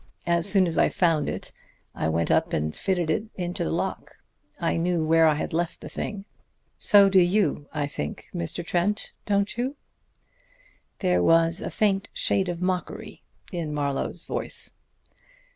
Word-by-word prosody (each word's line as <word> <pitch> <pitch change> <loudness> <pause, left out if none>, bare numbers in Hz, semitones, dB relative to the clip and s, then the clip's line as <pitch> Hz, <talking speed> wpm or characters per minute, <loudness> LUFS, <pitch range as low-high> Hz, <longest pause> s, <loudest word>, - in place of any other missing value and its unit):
As 170 +2 +2
soon 195 -1 +5
as 165 -2 0
I - - +4
found 165 -5 +1
it - - -5 0.4
I 80 - -1
went 85 +1 0
up - - +2
and 75 0 -1
fitted 175 -4 0
it 215 +7 -2 0.2
to - - -2
the - - -2
lock. - - -3 0.4
I - - 0
knew 170 -1 0
where 165 0 +5
I 155 - +3
had 150 - -4
left 170 +1 -1
the - - -9
thing. 205 -2 -5 0.5
So 200 -2 +6
do 195 -1 +5
you, 175 -5 +1
I 150 -2 -1
think, 75 - -5
Mr. 85 - -3
Trent. 190 +6 -1
Don't 200 +1 0
you?" 260 +4 -1 1.3
There 180 -2 +2
was 165 +1 +3
a - - -3
faint 200 -2 0
shade 190 -2 +1
of 175 0 -4
mockery 180 -1 -3 0.3
in 165 -5 -3
Marlowe's 140 -2 -2
voice. - - +2
175 Hz, 160 wpm, -25 LUFS, 155-195 Hz, 1.3 s, So